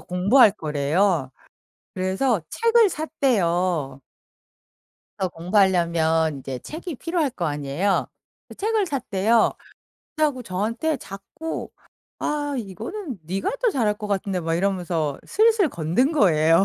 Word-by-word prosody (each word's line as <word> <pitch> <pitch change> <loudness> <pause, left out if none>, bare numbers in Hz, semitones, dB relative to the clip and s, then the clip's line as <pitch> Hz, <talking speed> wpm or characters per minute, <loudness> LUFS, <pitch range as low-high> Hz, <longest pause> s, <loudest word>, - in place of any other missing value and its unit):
공부할 200 +7 +5
거래요. 155 -2 0 0.6
그래서 190 +2 0
책을 460 -3 +4
샀대요. 180 - 0 1.2
그래서 190 - 0
공부하려면 170 -4 +2
이제 130 -1 -6
책이 320 0 -7
필요할 330 -2 -1
거 175 -8 -3
아니에요. 145 +6 0 0.4
그 - - -12
책을 430 -1 0
샀대요. 230 - +1 0.7
하고 290 -5 +1
저한테 230 +10 -1
자꾸 230 +9 -7 0.5
"아 290 -1 -2
이거는 250 - -6
네가 190 - -2
더 485 -3 +3
잘할 225 - +1
것 210 0 -6
같은데." 195 -2 -1
막 165 0 -1
이러면서 175 -6 -1
슬슬 435 -5 +3
건든 175 - +1
거에요. 165 - +4
195 Hz, 260 characters per minute, -23 LUFS, 170-280 Hz, 1.2 s, 공부할